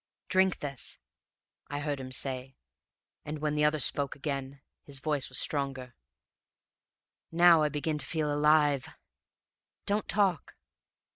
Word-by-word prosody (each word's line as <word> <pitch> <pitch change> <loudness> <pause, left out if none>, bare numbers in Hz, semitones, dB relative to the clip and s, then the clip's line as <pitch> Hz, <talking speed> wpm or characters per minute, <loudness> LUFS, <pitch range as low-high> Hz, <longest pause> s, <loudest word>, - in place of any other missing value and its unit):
"'Drink 190 0 +3
this,' 140 -5 -2 0.7
I 145 0 -4
heard 145 -1 -2
him 130 -1 -7
say, 130 0 -1 0.7
and, 150 +1 -5
when 150 0 -1
the 150 0 +1
other 150 +1 +3
spoke 140 -1 0
again, 140 -1 -4 0.2
his 140 -1 -8
voice 145 0 -1
was - - -4
stronger. 135 -3 -2 1.4
"'Now 170 -1 +6
I 150 - +2
begin 150 +1 -2
to 130 - +2
feel 155 -3 -1
alive 150 -2 +3 0.4
...' - - -61
"'Don't 205 +1 0
talk!' 195 -6 0
145 Hz, 135 wpm, -30 LUFS, 135-155 Hz, 1.4 s, Now